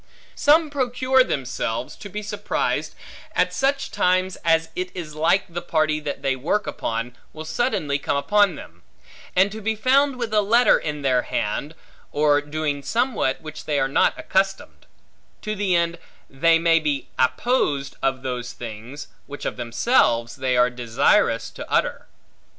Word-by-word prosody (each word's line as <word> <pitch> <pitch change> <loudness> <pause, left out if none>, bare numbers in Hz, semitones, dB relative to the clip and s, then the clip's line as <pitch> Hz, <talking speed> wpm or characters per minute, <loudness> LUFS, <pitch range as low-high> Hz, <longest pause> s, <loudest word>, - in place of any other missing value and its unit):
Some 305 +1 +3
procure 260 -1 +2
themselves, 130 - -3
to 205 - -9
be 210 +2 -5
surprised, 210 - -2 0.4
at - - +2
such 275 +1 0
times 185 +1 +1
as 165 0 +1
it 180 0 -3
is 165 -4 -6
like 165 +5 +2
the 175 0 -5
party 155 -2 0
that 145 -2 -5
they 135 -1 +1
work 165 +11 -1
upon, 115 +2 -4 0.2
will 155 0 -8
suddenly 155 - -1
come 140 - -1
upon 200 +5 +3
them; 85 -10 -12 0.5
and 190 +2 +4
to 220 +1 -7
be 220 +1 -1
found 265 +5 +3
with 235 -3 -4
a 210 - +4
letter 230 +5 +4
in 150 -2 -4
their 130 -2 +3
hand, 140 +8 -3 0.4
or 145 0 +3
doing 145 -1 -3
somewhat 230 - 0
which 155 -1 -8
they 150 -2 0
are 135 - +2
not 135 - +2
accustomed; 195 0 -2 0.6
to 215 - -2
the 195 -3 0
end, 170 0 0 0.3
they 165 +5 +3
may 165 0 +3
be 150 -3 -2
apposed 140 - +1
of 135 -1 -1
those 125 -2 -4
things, 120 +5 -8 0.2
which 145 0 -8
of - - -2
themselves 120 - +1
they 130 -1 0
are 125 0 +4
desirous 120 -2 +1
to - - -9
utter. - - 0
155 Hz, 160 wpm, -23 LUFS, 135-205 Hz, 0.6 s, and